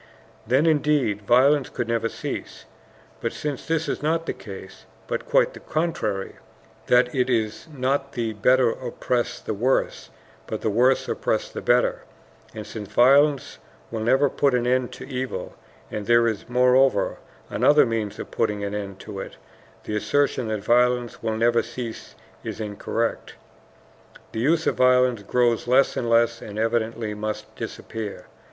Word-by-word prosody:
Then, 130 +6 +3
indeed, 145 -9 +2
violence 135 +3 +4
could 120 - -3
never 115 -1 0
cease. - - -6 0.6
But - - -2
since 145 -3 -5
this 165 -1 0
is - - -2
not 165 +2 0
the - - -2
case, 95 -2 -11 0.2
but - - -4
quite - - +3
the - - -10
contrary, 110 - -2 0.5
that 125 0 +4
it 130 -1 +1
is 110 +2 -1
not 135 0 -1
the 115 -3 -2
better 125 +3 +3
oppress 125 0 -2
the - - -4
worse, 125 +6 0 0.4
but - - -4
the 110 - 0
worse 125 +5 +3
oppress - - -1
the - - -6
better, - - +2 0.5
and 110 -1 -6
since 105 -3 -8
violence 140 +2 +4 0.3
will 115 - -3
never 130 +6 +3
put 140 -1 +1
an 120 -1 0
end 125 0 +1
to - - -9
evil, 130 -1 -4 0.4
and 105 -1 -5
there 120 0 +5
is, 110 0 -3
moreover, 125 -3 +3 0.3
another 150 +1 +5
means 115 -3 -2
of - - -8
putting 105 -1 -1
an 100 0 -3
end 100 -2 -5
to - - -7
it, - - -7 0.5
the 105 - -4
assertion 130 +2 +1
that 110 -2 -3
violence 125 +1 +2
will 110 -1 -2
never 115 +1 +3
cease 115 - -7 0.3
is - - -6
incorrect. 110 +2 -3 1.0
The 110 - -4
use 160 +7 +2
of - - 0
violence 125 -2 +4
grows 120 +3 +1
less 130 +2 +4
and 120 - -2
less 115 0 +3
and 105 0 -8
evidently 115 -1 -1
must 105 0 -5
disappear. 110 -3 -6
120 Hz, 160 wpm, -24 LUFS, 110-130 Hz, 1.0 s, there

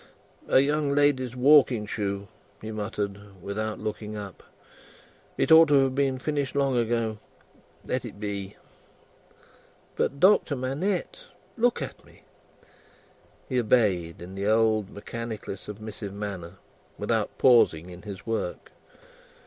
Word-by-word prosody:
"A - - +5
young 145 +1 +1
lady's 140 -3 +2
walking 130 -4 +5
shoe," 100 -1 -3 0.3
he 110 - -7
muttered, 100 -2 -5
without 105 +4 -4
looking 105 0 -5
up. 100 -3 -8 1.0
"It - - +1
ought 160 0 +9
to 140 -2 +5
have 135 -1 0
been 135 -1 +1
finished 140 0 -2
long 140 -2 +2
ago. 115 -2 0 0.7
Let - - -2
it - - -9
be." 100 -1 -5 1.4
"But, 140 - -1
Doctor 185 -5 +4
Manette. 175 - -2 0.3
Look 240 0 +1
at - - -9
me!" - - -21 1.2
He 130 -2 0
obeyed, 100 -9 +1
in 90 +2 -9
the 100 +1 -3
old 110 -2 +2
mechanically 110 -1 -6
submissive 105 0 -8
manner, 95 -4 -5 0.4
without - - -1
pausing 90 -9 +4
in 90 0 -11
his 100 -3 -9
work. 115 -6 -3
110 Hz, 125 wpm, -26 LUFS, 100-135 Hz, 1.4 s, ought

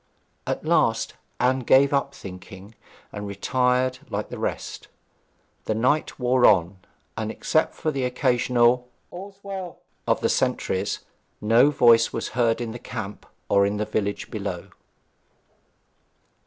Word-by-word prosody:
At - - -3
last - - +2 0.3
Anne 130 +2 +2
gave 135 +3 +4
up 140 0 0
thinking, 95 +2 -10 0.4
and 105 0 -6
retired 125 +5 0
like - - -3
the - - -7
rest. - - -4 0.8
The 110 - -1
night 130 +7 +1
wore 125 0 +2
on, 95 -1 +3 0.4
and, 110 -1 -3
except 155 +7 -1
the 145 -5 0
occasional 125 -1 +2 0.2
'All's 195 +2 -9
well' 190 -3 -6 0.3
of - - +2
the - - +2
sentries, - - 0 0.4
no 115 +6 +5
voice 120 -5 +5
was 115 - -3
heard 115 -1 +1
in 115 -2 -3
the 120 - -7
camp 105 -3 -7 0.2
or 100 0 +4
in 100 +1 0
the 105 - -1
village 105 -1 -3
below. - - -5
120 Hz, 130 wpm, -24 LUFS, 105-130 Hz, 0.8 s, no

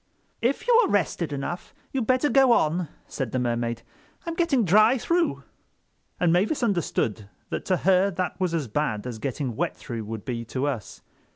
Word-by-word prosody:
"If 260 - 0
you - - +5
are - - 0
rested 175 -5 0
enough 145 +6 -5 0.2
you'd 255 -5 -1
better 255 +3 +3
go 270 -3 +5
on," 170 -3 +1 0.2
said 130 -5 -4
the - - -1
Mermaid. 120 -1 -1 0.4
"I'm 335 - -3
getting 320 -9 +2
dry 215 +8 +5
through." 340 +7 0 0.8
And 170 -2 +3
Mavis 210 - +1
understood 135 - -1 0.2
that - - -3
to 185 - +2
her 190 +3 +3
that 185 0 -3
was 180 -3 0
as 150 -6 -1
bad 110 -3 -1
as 120 -3 -5
getting 130 -1 -3
wet 90 - -2
through 110 +5 -6
would 110 -1 -6
be 120 -3 -3
to 130 +4 -2
us. 125 -9 -4
170 Hz, 180 wpm, -25 LUFS, -, 0.8 s, you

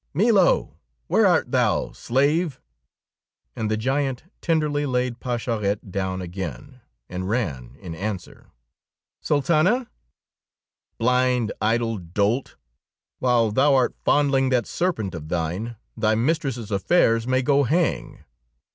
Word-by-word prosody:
"Milo! 200 0 +3 0.3
Where - - +3
art - - +2
thou, - - +1
slave!" 145 +5 0 1.0
And 110 -1 -2
the 110 - 0
giant 135 +2 -1 0.2
tenderly 150 -3 0
laid 125 -1 -1
Pascherette 110 -5 -2
down 95 -1 -2
again, 90 - -7 0.3
and 95 +1 -5
ran 80 - -2
in 85 - -7
answer. 95 +2 -6 0.7
"Sultana?" 170 - +2 1.1
"Blind, 125 -1 +2
idle 115 0 +1
dolt! 100 +9 -1 0.6
While 120 -3 +2
thou 135 +5 +4
art 130 -2 +2
fondling 135 -2 +3
that 125 -4 +1
serpent 160 - -2
of 80 -2 -7
thine, 90 +8 -2 0.2
thy 110 -1 +1
mistress's 125 -3 -1
affairs 115 - +2
may 130 0 +2
go 140 +2 +3
hang! 155 +5 -1
120 Hz, 110 wpm, -23 LUFS, 105-140 Hz, 1.1 s, thou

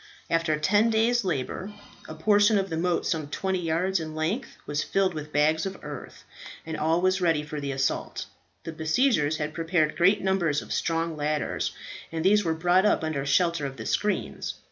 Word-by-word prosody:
After 165 -2 +2
ten 205 +8 +3
days' 230 +2 +2
labour, 185 +4 -3 0.3
a 155 - -7
portion 205 +5 +4
of 195 -2 -1
the - - -1
moat 175 +1 0
some 155 -3 -1
twenty 190 +5 -2
yards 175 +3 0
in 155 -1 -6
length 170 +12 -2
was 145 0 -1
filled 195 -2 +1
with 150 -1 -7
bags 155 +2 +2
of 195 - -6
earth, 145 -2 -8 0.4
and 160 -1 -4
all 160 +2 +1
was 185 +1 +2
ready 165 -4 +2
for 150 -1 -6
the 140 -1 -3
assault. 135 0 -2 0.4
The 165 - -5
besiegers 160 - +1
had 150 0 -3
prepared 165 -2 0
great 195 +4 +4
numbers 175 -6 +1
of - - -5
strong 165 -1 -1
ladders, 150 0 -1 0.4
and 165 +1 -3
these 205 +2 +5
were 165 -2 0
brought 175 +3 +3
up 210 - +2
under 155 -3 -2
shelter 170 +2 +2
of 135 -1 -9
the 110 - -7
screens. 210 0 -1
165 Hz, 190 wpm, -26 LUFS, 155-190 Hz, 0.4 s, these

